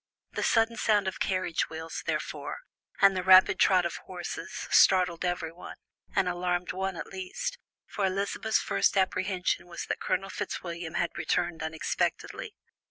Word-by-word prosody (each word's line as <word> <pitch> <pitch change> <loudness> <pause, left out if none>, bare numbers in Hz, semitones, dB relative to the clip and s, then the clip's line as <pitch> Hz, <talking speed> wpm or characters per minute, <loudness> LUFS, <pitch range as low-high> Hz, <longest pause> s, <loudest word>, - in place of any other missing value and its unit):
The - - -3
sudden 225 0 +2
sound 210 -4 +2
of 190 - -3
carriage 185 -3 0
wheels, 160 0 -6
therefore, - - -3 0.4
and 195 -1 +7
the 185 - 0
rapid 185 +1 +7
trot 185 -2 +5
of 170 - -2
horses, 175 -1 -6
startled 180 -3 +5
everyone, 175 -1 -4 0.4
and 195 -2 +3
alarmed 180 0 -1
one 190 0 -2
at - - -4
least, 190 - -5 0.3
for 205 - -4
Elizabeth's 200 +3 0
first - - +1
apprehension 185 -1 0
was 170 -1 -6
that - - -3
Colonel 190 +1 -1
Fitzwilliam 170 -2 -5
had 170 - 0
returned 175 -2 0
unexpectedly. 160 - -2
185 Hz, 145 wpm, -29 LUFS, 175-190 Hz, 0.4 s, and